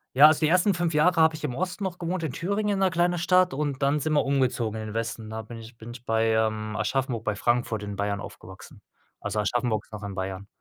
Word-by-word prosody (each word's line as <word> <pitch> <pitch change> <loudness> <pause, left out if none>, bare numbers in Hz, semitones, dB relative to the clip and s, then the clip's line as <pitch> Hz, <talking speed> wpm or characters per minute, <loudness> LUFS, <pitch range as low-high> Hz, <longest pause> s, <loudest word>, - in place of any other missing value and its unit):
Ja, 145 +3 +10
also, 155 0 +3
die 155 - +3
ersten 185 +3 +4
5 175 -2 -1
Jahre 165 +2 +4
habe 160 0 +4
ich 155 - -10
im 125 -3 -3
Osten 185 +2 -3
noch 180 -1 -4
gewohnt, 175 +1 -3
in 145 -6 -3
Thüringen 200 +4 -1
in 195 - -1
'ner 190 - +3
kleine 175 0 +1
Stadt 180 0 +3
und 140 -1 -2
dann 140 +2 +2
sind 155 +2 -1
wir 150 - +3
umgezogen 125 -5 0
in 110 - -6
den 105 - -7
Westen. 115 -1 -4
Da 110 0 -5
bin 115 +2 -10
ich 115 +1 -12
bin 115 +1 -9
ich 120 0 -11
bei, 115 0 +2
ähm, 110 -1 0
Aschaffenburg 120 +1 -1
bei 105 -1 -1
Frankfurt 120 -3 0
in 100 -1 -5
Bayern 100 0 -1
aufgewachsen. 95 0 -11 0.4
Also 105 +1 -2
Aschaffenburg 110 0 0
ist - - -23
noch 105 - -7
in 100 -1 -5
Bayern. 95 +1 -5
125 Hz, 255 wpm, -26 LUFS, 110-165 Hz, 0.4 s, Ja